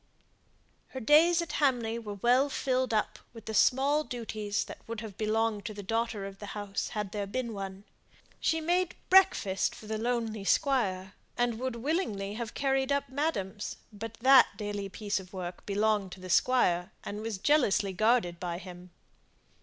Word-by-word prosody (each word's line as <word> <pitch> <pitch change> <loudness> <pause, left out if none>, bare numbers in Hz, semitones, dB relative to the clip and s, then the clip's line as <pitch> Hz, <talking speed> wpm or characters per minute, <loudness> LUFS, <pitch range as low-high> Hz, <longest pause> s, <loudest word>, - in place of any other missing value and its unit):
Her 260 - -7
days 325 +7 +5
at 335 - -7
Hamley 240 -5 +1
were 210 -3 -6
well 250 +7 +3
filled 260 -2 0
up 215 -1 0
with 225 -2 -12
the 220 - -5
small 275 +7 +3
duties 215 -5 -3
that - - -9
would 225 -1 -5
have 215 -4 -8
belonged 220 0 0
to 215 - -4
a - - -5
daughter 225 -1 -1
of 195 0 -9
the 205 - -7
house 205 -1 -3
had 210 -2 -2
there 205 -1 -3
been 235 +2 -3
one. 195 -1 -6 0.6
She 320 0 +1
made 355 +2 +1 0.2
breakfast 370 - +4
for - - -12
the 215 0 -3
lonely 225 -3 -1
squire, 195 -7 +1 0.2
and 240 -2 0
would 260 -1 -2
willingly 230 - -2
have 225 0 -5
carried 270 0 +1
up 280 0 0
madam's, 245 -9 -2 0.2
but 225 +2 -7
that 265 0 +8
daily 205 -2 -4
piece 205 +1 -2
of 185 0 -13
work 180 -1 -6
belonged 205 -2 +1
to - - -11
the 185 -1 -6
squire, 180 -8 +3
and 210 +1 -5
was 220 -2 -3
jealously 215 -5 +2
guarded 215 -4 +2
by 175 -1 -3
him. 180 -1 -10
220 Hz, 170 wpm, -30 LUFS, 200-255 Hz, 0.6 s, that